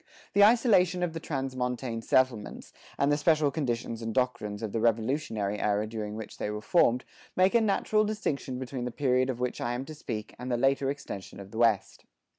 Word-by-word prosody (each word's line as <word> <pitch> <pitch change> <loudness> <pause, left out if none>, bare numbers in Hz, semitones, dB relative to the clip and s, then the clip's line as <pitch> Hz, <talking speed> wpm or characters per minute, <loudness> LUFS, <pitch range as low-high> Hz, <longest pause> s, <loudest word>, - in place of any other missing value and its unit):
The 200 - +6
isolation 205 -6 +4
of 170 -2 -1
the 165 - -4
transmontane 130 -5 -3
settlements, 125 -5 0 0.2
and 140 +1 +2
the 145 - +3
special 150 -1 +3
conditions 120 -5 -2
and 115 -1 -4
doctrines 115 -5 -1
of 110 - -3
the 115 - -1
Revolutionary 110 -3 0
era 105 0 +1
during 105 -1 -5
which 110 -1 -8
they - - -2
were 105 0 -3
formed, 125 0 +2 0.3
make 185 +1 +4
a 235 - +5
natural 215 0 +2
distinction 185 -12 -2
between 130 -1 -4
the - - -2
period 130 -1 +1
of 125 -2 -3
which 125 0 -2
I 120 - -1
am 125 +2 -4
to 155 - -8
speak 110 -7 -6
and 125 +1 -4
the 120 - +1
later 135 +2 +2
extension 135 -10 -6
of 100 0 -10
the 110 - -5
West. 115 -4 +1
125 Hz, 200 wpm, -29 LUFS, 115-145 Hz, 0.3 s, The